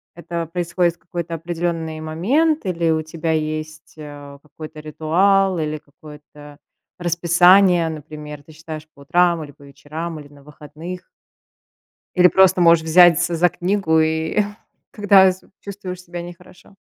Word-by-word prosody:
Это 170 -1 -5
происходит 175 0 -1
в - - -40
какой-то 170 -1 -6
определённый 165 -1 -4
момент 235 - 0
или 170 -3 0
у 160 0 0
тебя 160 +1 -4
есть, 155 0 -4
э, 145 -2 -10
какой-то 155 +1 -11
ритуал, 180 +5 +1
или 155 0 -3
какое-то 150 0 -15 0.4
расписание. 175 +1 +4
Например, 150 -1 -9
ты 155 - -17
читаешь 155 0 -9
по 140 - -18
утрам 170 +2 +1
или 145 - -11
по 145 0 -20
вечерам, 155 +4 -7
или 145 - -12
на 140 -1 -19
выходных. 155 +4 -10 1.1
Или 180 0 +6
просто 190 -1 +4
можешь 170 -1 +5
взяться 175 +1 +4
за 175 +2 +3
книгу, 180 -3 0
и 160 +5 0 0.5
когда 200 -3 +5
з 185 - -12 0.2
чувствуешь 185 -3 -8
себя 175 0 -7
нехорошо. 180 +2 -14
165 Hz, 140 wpm, -20 LUFS, 155-180 Hz, 1.1 s, Или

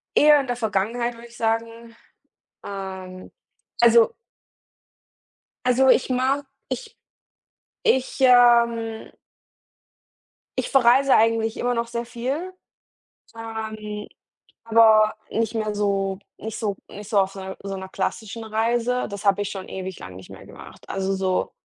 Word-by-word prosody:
eher 295 0 +6
in 275 - -4
der 245 -1 -2
Vergangenheit, 230 +2 -1
würde 235 +1 -13
ich 235 - -16
sagen. 230 0 -3 0.7
Ähm, 190 -2 -7 0.5
also 235 -1 +6 1.5
Also 255 +1 +4
ich 255 - +4
mag 260 +3 0 0.2
ich 440 -3 -6 0.9
ich, 265 - +1
ähm 235 -3 +4 1.5
ich - - -1
verreise 265 +1 +5
eigentlich 225 0 +2
immer 245 0 0
noch 235 0 -1
sehr 235 0 -4
viel. 265 +10 -4 0.8
Ähm, 220 -2 -6 0.6
aber 220 -1 +5 0.2
nicht 225 0 -1
mehr 215 -1 -2
so 195 -2 0 0.2
nicht 220 0 -6
so 205 -3 -2
nicht 205 0 -10
so 205 - +3
auf 195 0 0
'ne 190 0 -7
so 195 -1 -4
'ner 190 - -7
klassischen 220 +4 -4
Reise, 230 +3 0
das 200 0 -7
habe 200 0 +3
ich 205 - -4
schon 190 -2 -7
ewig 190 -1 -6
lang 90 0 -10
nicht 95 0 -12
mehr - - -12
gemacht. - - -14
Also 195 0 -1
so 190 -1 -1
225 Hz, 135 wpm, -23 LUFS, 200-240 Hz, 1.5 s, eher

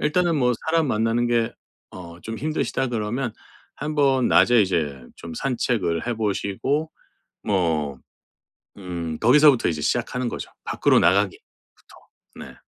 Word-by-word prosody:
일단은 165 +2 +1
뭐 125 -2 +2
"사람 160 -2 +2
만나는 115 +1 +1
게 120 -1 +1 0.4
어 85 -2 -11
좀 115 0 -6
힘드시다." 150 -2 -1
그러면 115 +1 -2 0.4
한번 140 -4 +1
낮에 120 -2 +5
이제 75 -8 -1 0.2
좀 85 - -9
산책을 115 -9 -1
해 120 - -1
보시고 110 +8 -1 0.5
뭐 80 -8 0 0.8
음 85 -4 -5
거기서부터 135 0 +5
이제 75 -3 -3
시작하는 125 +8 -1
거죠, - - -6
밖으로 - - +2
나가기부터. - - +2 1.0
네. - - -10
115 Hz, 270 characters per minute, -23 LUFS, 90-135 Hz, 1.0 s, 낮에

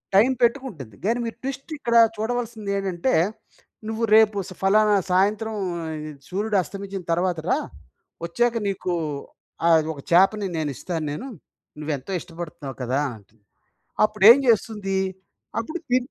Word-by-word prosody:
Time 220 +7 +6
పెట్టుకుంటుంది. 230 - -1
గానీ 235 +3 +1
మీరు 230 - -5
ట్విస్టిక్కడ 270 -2 -3 0.2
చూడవలసిందేంటంటే. 215 -3 -2 0.7
"నువ్వు 225 +1 -3
రేపు 215 -2 +5
స - - -8
ఫలానా 210 +2 +4 0.2
సాయంత్రం 210 +4 +2 0.7
సూర్యుడు 205 +3 0
అస్తమించిన 195 +2 -7
తరువాత 175 0 +1
రా! - - +3 0.7
ఒచ్చాక 240 +7 +1
నీకు 185 -2 -2 0.7
ఆహ్, 165 -1 +6
ఒక 145 - -12
చేపని 195 +3 +4
నేనిస్తాను 155 +2 -3
నేను. 195 - -5 0.5
నువ్వెంతో 150 +1 -4
ఇష్టపడుతున్నావు 165 -6 -8
కదా!" 130 +3 0 0.2
అంటుంది. 105 +1 -25 0.6
అప్పుడేం 215 +3 +7
జేస్తుంది? 210 -3 +1 0.6
అప్పుడు 310 +10 -4
తి 250 - +4
200 Hz, 110 wpm, -24 LUFS, 170-225 Hz, 0.7 s, అప్పుడేం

